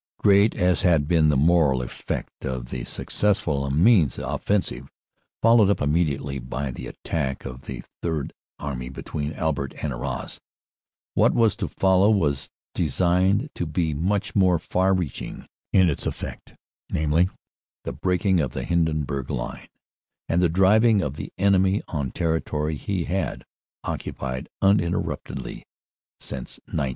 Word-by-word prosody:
Great 100 +1 +5
as 90 0 +2
had 80 -5 +3
been 80 -2 +4
the 75 - +3
moral 75 -3 +4
effect - - -5
of 65 -2 -4
the 60 -2 -3
successful 85 -9 0
Amiens 80 - +4
offensive, 70 -10 -2 0.5
followed 115 -3 +6
up 100 - +2
immediately 75 -3 0
by 65 +2 -4
the - - -7
attack 70 -5 -3
of 65 -1 -8
the 65 -2 -6 0.2
Third 80 -4 -2 0.2
Army 65 -3 -4
between 75 +2 -4
Albert 70 -5 -2
and 75 -3 -1
Arras, 60 +1 -5 0.7
what - - +3
was 115 -3 +4
to - - -2
follow 95 +1 +3
was 75 -10 +1 0.2
designed 90 - +2
to 85 - -3
be 80 0 0
much 95 +7 -1
more 95 -3 +4
far 95 +4 +1
reaching 85 -7 -4 0.3
in 95 -2 +5
its 75 - -1
effect, - - -6 0.3
namely, 80 +4 +2 0.5
the - - -4
breaking 90 - +1
of 65 -6 -1
the - - -3
Hindenburg 75 -6 0
line - - -4 0.6
and 85 +2 +2
the 90 - +4
driving 100 +5 +5
in - - -1
of 70 -1 -4
the - - -7
enemy 95 0 +3
on 70 -5 -2
territory 80 -1 -1
he 90 +4 -2
had 95 +4 -2 0.4
occupied 65 -1 -4
uninterruptedly 95 -3 0 0.6
since 65 -1 -7
1914. 65 - -1
80 Hz, 140 wpm, -24 LUFS, 70-95 Hz, 0.7 s, followed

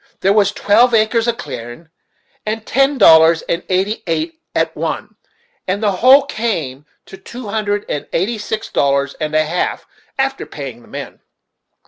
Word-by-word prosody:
There 195 +1 +3
was 200 -2 +3
twelve 230 +4 +3
acres 225 +1 +2
of 235 -1 0
clearin' 130 +3 -8 0.6
at 220 +1 -3
ten 275 +2 +2
dollars, 160 -4 +6
and 170 - -2
eighty 195 +4 0
eight 320 - -2
at - - 0
one, - - -4 0.5
and 200 +4 -1
the 205 - +3
whole 255 +9 +6
came 160 - -3 0.2
to 190 - -12
two 235 +4 -9
hundred 205 -1 -1
and 145 - -4
eighty 215 +6 -1
six 215 +1 -4
dollars 140 0 +1
and 155 0 -2
a 155 0 +3
half, 170 +3 -2 0.3
after 270 0 -1
paying 130 -5 -8
the - - -19
men." - - -8
205 Hz, 160 wpm, -17 LUFS, 160-230 Hz, 0.6 s, dollars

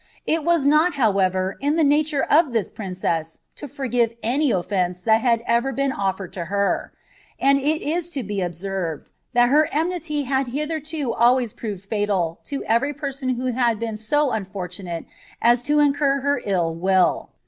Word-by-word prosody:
It 320 -1 0
was 335 -3 +2
not, 305 +4 +4
however, 190 -6 +1
in 290 +2 +1
the 325 - +3
nature 295 0 +2
of 300 -4 +3
this 225 -4 -1
princess 175 -5 -3 0.2
to 295 - -8
forgive 240 -3 -1
any 275 +6 +1
offence 180 -2 -1
that 220 +2 +4
had 230 -1 +2
ever 235 +3 +1
been 275 +1 0
ofifered 195 -4 -2
to 180 -3 -5
her; 200 +2 -1 0.5
and 275 0 +4
It 305 +3 0
is 335 +3 -2
to 265 - -2
be 205 -1 -3
observed, 175 -2 -4 0.2
that 240 0 +4
her 300 +3 +4
enmity 320 -2 -1
had 265 0 0
hitherto 300 0 -3
always 240 -1 +3
proved 200 -4 -6
fatal 200 -6 -1
to 280 -1 -4
every 255 +6 +1
person 275 -2 -4
who 250 +1 -2
had 235 -3 +1
been 225 -1 -3
so 275 +6 +1
unfortunate 185 -4 -5 0.3
as 240 +1 +4
to 295 +4 +1
incur 285 -1 +2
her 285 +1 0
ill 175 -5 0
will. 185 +2 +1
240 Hz, 170 wpm, -22 LUFS, 195-285 Hz, 0.5 s, not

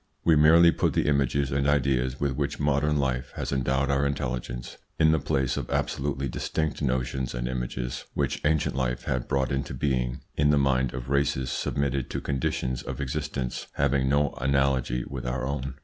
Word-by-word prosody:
We 80 - +5
merely 80 +3 +7
put - - 0
the - - +1
images 70 -1 +1
and 70 +1 +1
ideas 65 -3 +1
with 70 -1 +1
which 70 +1 -2
modern 75 +1 +2
life 65 -2 -1
has - - -3
endowed 65 +1 +1
our 70 0 +2
intelligence 60 -3 -4 0.2
in 80 -1 +5
the 80 - +3
place 65 -2 0
of - - -4
absolutely 70 0 -1
distinct 80 +5 -2
notions 65 -1 -1
and - - -2
images - - -4
which - - -1
ancient 75 -3 +1
life 60 -2 -1
had 65 -2 -2
brought 65 -2 0
into 70 +1 -2
being 65 -3 -1
in 75 0 +3
the 75 - +4
mind 65 -3 +2
of 65 +1 -6
races 70 -2 +1
submitted 70 -2 -1
to - - -2
conditions 65 -2 -2
of - - -6
existence 70 -2 -3
having 70 -1 +1
no 70 +1 +2
analogy 65 -2 +1
with 65 -3 -5
our 65 +1 -2
own. 65 -1 -3
70 Hz, 180 wpm, -27 LUFS, 65-70 Hz, 0.2 s, merely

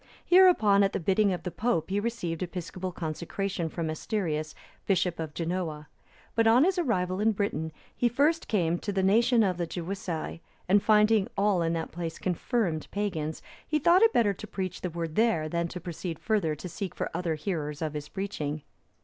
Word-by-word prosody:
Hereupon 350 - +6
at 195 -1 +2
the - - -1
bidding 195 +3 +2
of 180 -2 -3
the 180 - -3
Pope 190 -1 -1
he 200 - +1
received 205 -7 -3
episcopal 180 +1 -4
consecration 170 +2 -3
from 165 0 -3
Asterius, 155 -2 -2 0.3
bishop 180 -3 +1
of 160 -2 -5
Genoa;(319) 165 -3 -3 0.5
but 225 0 +3
on 235 +4 +6
his 370 +1 +2
arrival 185 - 0
in 220 +1 +3
Britain, 200 -6 -2 0.2
he 240 - +2
first 295 +7 +2
came 175 -5 +1
to 205 - -3
the 195 -1 0
nation 230 +4 +4
of 185 -3 +1
the 170 -1 -2
Gewissae, 175 -2 -4 0.3
and 200 +2 +5
finding 210 -1 +4
all 200 -3 +3
in 165 0 +1
that 165 -1 -3
place 165 -1 -5
confirmed 180 -2 -1
pagans, 165 -7 -3 0.2
he 305 - +1
thought 345 +5 +5
it 455 0 +6
better 220 - +3
to 215 +3 -9
preach 185 -2 -4
the 180 - -2
Word 165 -1 -4
there, 215 -7 +2
than 170 +2 -1
to 180 - -7
proceed 175 -1 -5
further 195 -8 0
to 165 - -7
seek 190 +2 -5
for - - -3
other 170 -1 -1
hearers 150 -3 -3
of 155 -2 -2
his 150 -1 -6
preaching. 155 -7 -4
185 Hz, 190 wpm, -28 LUFS, 165-210 Hz, 0.5 s, Hereupon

